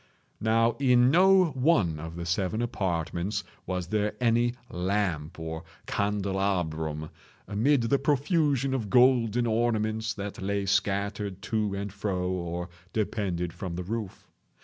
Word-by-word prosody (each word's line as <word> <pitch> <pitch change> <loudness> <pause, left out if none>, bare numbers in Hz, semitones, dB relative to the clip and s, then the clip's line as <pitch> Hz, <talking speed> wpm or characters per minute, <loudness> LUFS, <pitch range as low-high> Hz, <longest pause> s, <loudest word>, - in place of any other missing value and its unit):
Now 115 +1 +3
in 125 -2 +5
no 185 0 +5
one 125 - +2
of 80 +1 -7
the 85 0 -5
seven 95 +6 0
apartments 90 -3 -2 0.2
was 90 -1 -2
there 105 0 0
any 120 0 +2 0.2
lamp 90 -3 -1
or 80 0 -5 0.2
candelabrum, 95 -7 -1 0.4
amid 120 +7 +2
the 135 +4 +2
profusion 140 -1 +1
of 115 -6 -2
golden 120 -2 +4
ornaments 110 -1 0
that 100 -1 -6
lay 100 +1 -1
scattered 100 0 -1
to 105 -2 +1
and 100 -1 -4
fro 95 -3 -2
or 90 -1 -3 0.3
depended 95 -6 -1
from 85 0 -5
the 90 - -3
roof. 105 0 -5
100 Hz, 125 wpm, -28 LUFS, 90-120 Hz, 0.4 s, in